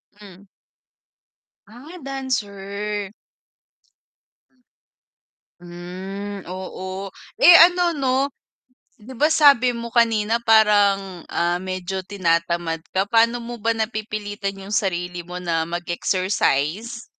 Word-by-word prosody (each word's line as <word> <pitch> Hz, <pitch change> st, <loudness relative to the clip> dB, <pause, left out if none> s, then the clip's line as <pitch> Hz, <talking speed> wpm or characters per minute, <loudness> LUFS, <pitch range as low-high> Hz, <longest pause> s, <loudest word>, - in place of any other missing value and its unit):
Hmm. 200 Hz, -1 st, -15 dB, 1.2 s
Ah, 255 Hz, -, -13 dB
dancer. 205 Hz, -6 st, -4 dB, 2.5 s
Hmm, 185 Hz, +3 st, -8 dB
oo, 185 Hz, +1 st, -6 dB, 0.3 s
eh, 355 Hz, -7 st, +10 dB
ano 355 Hz, 0 st, +1 dB
'no 260 Hz, -2 st, +1 dB, 0.8 s
'di 250 Hz, +5 st, -11 dB
ba 300 Hz, +6 st, +2 dB
sabi 280 Hz, -5 st, +5 dB
mo 235 Hz, -1 st, -6 dB
kanina 230 Hz, -2 st, +2 dB
parang, 205 Hz, -5 st, +3 dB
ah, 175 Hz, +1 st, 0 dB
medyo 185 Hz, 0 st, -4 dB
tinatamad 170 Hz, -3 st, -1 dB
ka, 190 Hz, +1 st, 0 dB
paano 230 Hz, +2 st, +3 dB
mo 240 Hz, 0 st, -7 dB
ba 230 Hz, 0 st, -1 dB
napipilitan 215 Hz, -3 st, -4 dB
yung 195 Hz, +2 st, -8 dB
sarili 180 Hz, -3 st, -2 dB
mo 180 Hz, +1 st, -8 dB
na 165 Hz, -2 st, -1 dB
mag-exercise? 185 Hz, -, -1 dB
200 Hz, 95 wpm, -22 LUFS, 185-230 Hz, 2.5 s, eh